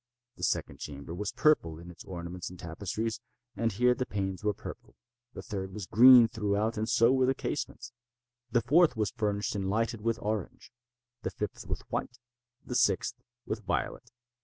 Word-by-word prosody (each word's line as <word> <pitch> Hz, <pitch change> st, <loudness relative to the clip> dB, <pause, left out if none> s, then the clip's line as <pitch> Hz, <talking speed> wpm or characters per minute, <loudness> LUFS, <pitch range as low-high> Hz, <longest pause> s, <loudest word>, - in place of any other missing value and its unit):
The -, -, -10 dB
second -, -, -1 dB
chamber 70 Hz, +2 st, -7 dB
was 100 Hz, +3 st, -3 dB
purple 85 Hz, -, +2 dB
in 85 Hz, +2 st, -10 dB
its 85 Hz, -, -12 dB
ornaments 90 Hz, 0 st, -6 dB
and 90 Hz, -, -11 dB
tapestries, 100 Hz, +7 st, -4 dB, 0.3 s
and 115 Hz, 0 st, 0 dB
here 125 Hz, +5 st, +3 dB
the 125 Hz, 0 st, -3 dB
panes 95 Hz, -1 st, -3 dB
were 105 Hz, -, +2 dB
purple. -, -, -10 dB, 0.4 s
The -, -, -7 dB
third 95 Hz, -3 st, -5 dB
was 105 Hz, -3 st, -5 dB
green 120 Hz, +5 st, +8 dB
throughout, 110 Hz, 0 st, 0 dB
and 110 Hz, +1 st, -2 dB
so 115 Hz, +2 st, +5 dB
were 130 Hz, -1 st, +3 dB
the 135 Hz, -, +2 dB
casements. 125 Hz, -3 st, -4 dB, 0.6 s
The 120 Hz, -, +3 dB
fourth 150 Hz, 0 st, +4 dB
was 105 Hz, -3 st, 0 dB
furnished 105 Hz, -3 st, -1 dB
and 95 Hz, -2 st, -2 dB
lighted 115 Hz, +2 st, 0 dB
with 115 Hz, +1 st, 0 dB
orange—the 120 Hz, +3 st, -6 dB
fifth -, -, -5 dB
with -, -, -3 dB
white—the 120 Hz, 0 st, -7 dB
sixth 95 Hz, -6 st, +1 dB, 0.2 s
with -, -, -3 dB
violet. -, -, -2 dB
110 Hz, 165 wpm, -30 LUFS, 95-120 Hz, 0.6 s, green